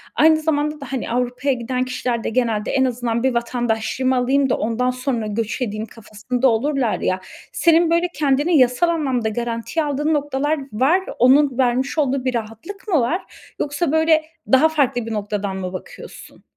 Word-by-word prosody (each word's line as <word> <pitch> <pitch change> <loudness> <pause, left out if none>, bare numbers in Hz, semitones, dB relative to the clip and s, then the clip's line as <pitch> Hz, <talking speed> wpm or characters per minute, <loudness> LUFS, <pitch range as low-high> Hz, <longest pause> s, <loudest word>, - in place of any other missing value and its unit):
aynı 315 0 +5
zamanda 300 -1 -1
da 275 - -8
hani 260 -3 -3
Avrupa'ya 250 +3 0
giden 250 +1 -2
kişiler 250 -2 -2
de - - -1
genelde 225 -3 0
“en 265 -1 +2
azından 240 -2 -2
bir 260 -1 +2
vatandaşlığımı 240 +2 -1
alayım 265 +2 +2
da, - - +1
ondan 230 +3 0
sonra 250 -3 -2
göç 225 +3 -3
edeyim“ 215 -2 -2
kafasında 230 +3 -2
olurlar, 245 0 0
ya, 185 - 0 0.3
senin 335 0 +3
böyle 340 +1 +2
kendini 295 +3 +2
yasal 255 +6 +3
anlamda 265 -9 0
garantiye 235 +7 -2
aldığın 295 +2 0
noktalar 290 +1 0
var. 275 - +3 0.2
Onun 265 +1 +4
vermiş 260 +3 +1
olduğu 275 -3 0
bir 255 - 0
rahatlık 235 - -6
mı 345 -7 +3
var? 325 +11 -4
Yoksa, 290 +2 -1
böyle, 315 0 +3 0.3
daha 270 +4 +6
farklı 270 -6 0
bir 230 - -5
noktadan 205 -2 -3
mı 185 -1 -5
bakıyorsun? 185 - -10
255 Hz, 165 wpm, -20 LUFS, 235-295 Hz, 0.3 s, daha